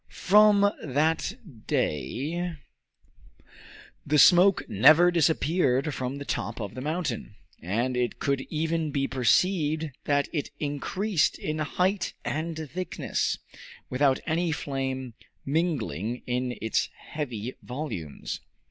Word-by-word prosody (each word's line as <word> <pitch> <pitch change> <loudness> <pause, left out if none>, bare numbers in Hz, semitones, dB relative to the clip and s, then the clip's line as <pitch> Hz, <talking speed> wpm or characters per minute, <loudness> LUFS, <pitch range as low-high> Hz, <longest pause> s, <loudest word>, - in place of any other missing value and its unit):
From 210 +1 +5 0.2
that 155 +6 +1 0.3
day 155 - -1 1.5
the 150 +1 +1
smoke 180 +5 +6
never 155 - +6
disappeared 155 -4 +2
from 130 0 -3
the 140 0 -7
top - - -3
of 105 -3 -5
the 130 - -6
mountain, 150 - -3 0.3
and 115 +9 -1
it 125 -1 -1
could 140 -1 0
even 160 0 -1
be 135 -1 0
perceived 155 +4 +2
that 145 -1 +2
it 150 -4 -2
increased 155 +5 0
in 155 0 -3
height 180 +5 0
and 160 +1 -3
thickness, 185 +1 -2 0.5
without 130 +1 +3
any 170 +1 0
flame 130 -4 -3 0.3
mingling 135 - -1
in 125 0 -2
its 110 - 0
heavy 125 -6 -5
volumes. 125 - -5
150 Hz, 110 wpm, -27 LUFS, 130-165 Hz, 1.5 s, smoke